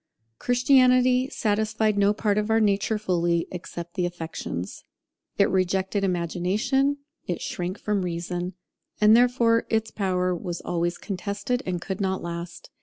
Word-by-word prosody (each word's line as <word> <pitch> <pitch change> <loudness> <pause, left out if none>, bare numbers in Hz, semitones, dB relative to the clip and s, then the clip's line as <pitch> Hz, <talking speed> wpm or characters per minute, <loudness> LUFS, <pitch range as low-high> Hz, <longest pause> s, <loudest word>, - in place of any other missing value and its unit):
Christianity 255 0 +4
satisfied 215 -3 0
no 200 0 +4
part 210 -1 +1
of 210 +1 -2
our 220 0 +4
nature 210 +1 +1
fully, 175 -4 0
except 170 -1 -7
the 180 -1 0
affections. 165 - -6 0.5
It 200 - +5
rejected 190 +2 0
Imagination, 190 - 0 0.3
it 175 - -2
shrank 180 +3 -4
from 210 -1 -1
Reason; 175 +1 -3 0.5
and 215 +1 +7
therefore 235 -1 +3
its 220 0 0
power 185 -2 0
was 175 0 -5
always 175 0 -1
contested, 200 +5 -3
and 180 -1 -1
could 190 +2 -4
not 190 -1 -1
last. 170 0 -7
195 Hz, 135 wpm, -25 LUFS, 175-220 Hz, 0.5 s, and